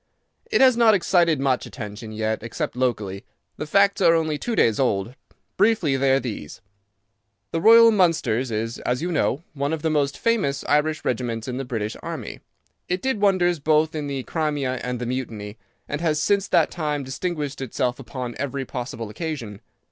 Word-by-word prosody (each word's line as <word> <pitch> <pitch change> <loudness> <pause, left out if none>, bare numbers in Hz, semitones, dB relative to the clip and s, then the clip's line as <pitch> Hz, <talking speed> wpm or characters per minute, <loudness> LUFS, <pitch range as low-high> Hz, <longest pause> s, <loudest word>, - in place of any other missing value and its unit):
"It - - +2
has 260 -2 +6
not 230 -2 +5
excited 170 -5 +2
much 135 -2 0
attention 110 -2 -8
yet, 110 0 -2
except 115 +2 -4
locally. 110 -7 -2 0.3
The 150 - -5
facts 200 +4 +3
are 170 -2 +6
only 160 -2 0
two 235 - -2
days 115 - +3
old. 115 -3 0 0.4
Briefly 200 -9 +3
they 135 0 +2
are 135 - +4
these: 105 - -6 0.9
"The 165 - -1
Royal 230 +3 +8
Mallows 155 - +2
is, 115 +1 -3
as 125 +4 -2
you 180 - -1
know, 155 -2 0
one 140 0 -2
of 160 - -4
the 160 - +1
most 140 -2 0
famous 195 -13 0
Irish 150 +1 +1
regiments 115 -2 -2
in 125 -1 -3
the 135 - -3
British 110 -4 -3
army. - - -6 0.5
It 180 +1 -1
did 265 -6 -1
wonders 180 -4 +3
both 155 +2 +2
in 150 -2 -3
the 135 -2 -3
Crimea 145 -5 -2
and 125 0 -2
the 120 - -3
Mutiny, 115 -4 -5 0.3
and 145 +2 -4
has 155 -3 +1
since 200 +4 +1
that - - +3
time 150 -4 -2
distinguished 145 +1 -4
itself 125 0 -2
upon 125 -1 -6
every 140 0 -3
possible 120 -3 -5
occasion. 115 - -5
140 Hz, 180 wpm, -23 LUFS, 125-165 Hz, 0.9 s, Royal